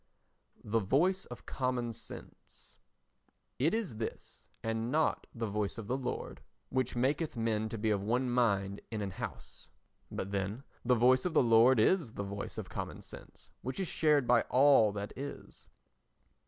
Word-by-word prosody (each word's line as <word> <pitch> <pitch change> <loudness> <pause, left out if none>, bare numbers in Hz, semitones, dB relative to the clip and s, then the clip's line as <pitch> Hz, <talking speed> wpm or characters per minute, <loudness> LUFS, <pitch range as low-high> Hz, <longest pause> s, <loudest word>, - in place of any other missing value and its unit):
The 115 +2 +1
Voice 170 - +2
of 125 - -10
Common 125 -3 -1
Sense - - -11 0.8
It 150 +6 +3
is 205 - -3
this, 110 - -6 0.2
and 115 +1 -1
not 155 +2 +1
the 115 -1 -2
Voice 105 -1 -2
of 115 - -6
the 125 - -1
Lord, 125 -2 -4 0.3
which 130 -1 -1
maketh 140 +4 0
men 110 -1 0
to 115 - -4
be 110 0 0
of 100 -2 +1
one 120 +5 0
mind 100 -5 +1
in 110 -2 -2
an 100 - -3
house. - - -8 0.4
But 95 - -4
then, 100 +5 -2 0.2
the 125 +1 +4
Voice 130 +2 +5
of 175 -3 -2
the - - +6
Lord 115 +2 +6
is 140 - +3
the 100 - -4
voice 100 0 -6
of - - -4
common - - -6
sense - - -13
which 130 +6 -4
is 190 - -1
shared 150 -5 +3
by 120 0 +5
all 130 -5 +6
that 100 0 -5
is. 140 +2 -8
120 Hz, 170 wpm, -32 LUFS, 110-130 Hz, 0.8 s, the